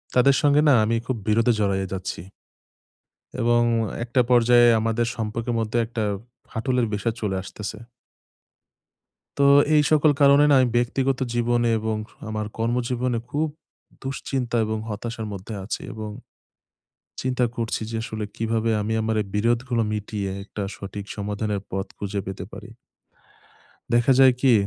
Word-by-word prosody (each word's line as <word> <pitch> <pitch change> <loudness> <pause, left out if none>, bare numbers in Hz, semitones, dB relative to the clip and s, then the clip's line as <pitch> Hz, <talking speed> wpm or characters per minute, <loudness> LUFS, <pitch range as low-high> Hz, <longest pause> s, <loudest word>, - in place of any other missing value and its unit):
তাদের 135 +2 +5
সঙ্গে 145 0 +4
না 140 - +7
আমি 115 +2 +1
খুব 130 - -1
বিরোধে 115 +2 +3
জড়ায়ে 95 -2 0
যাচ্ছি। 95 -3 -4 1.2
এবং 120 0 +3 0.4
একটা 125 +2 +1
পর্যায়ে 120 0 +6
আমাদের 115 +1 0
সম্পর্কের 115 +2 -3
মধ্যে 115 +2 -1
একটা 115 -1 -3 0.5
ফাটলের 125 +1 0
বিষয় 110 +2 -1
চলে 100 -3 -1
আসতেছে। 105 +2 -7 1.6
তো - - +5 0.3
এই 150 - +6
সকল 155 0 +5
কারণে 140 +1 +6
না - - +6
আমি 125 - +3
ব্যক্তিগত 130 +2 +1 0.2
জীবনে 120 0 +1
এবং 110 0 -2 0.3
আমার 110 -1 -3
কর্মজীবনে 120 +1 0
খুব 155 +2 0 0.5
দুশ্চিন্তা 130 -2 -3
এবং 110 0 -2
হতাশার 110 +1 -5
মধ্যে 100 +3 -7
আছি 105 - -4
এবং 110 -1 -6 1.1
চিন্তা 125 -1 0
করছি 115 -1 -2
যে 115 - -3
আসলে 110 -2 -4
কিভাবে 115 0 0
আমি 105 +2 -2
আমার 110 0 0
এই - - -11
বিরোধগুলো 120 +2 +1
মিটিয়ে 105 -1 -3
একটা 105 0 -6
সঠিক 100 -1 -7
সমাধানের 105 0 -2
পথ 95 +1 -2
খুঁজে 100 0 -3
পেতে 95 -1 -5
পারি। 105 +2 -10 1.2
দেখা 120 +3 +4
যায় 130 -1 +8
কি 135 -2 +5
115 Hz, 140 wpm, -24 LUFS, 105-125 Hz, 1.6 s, যায়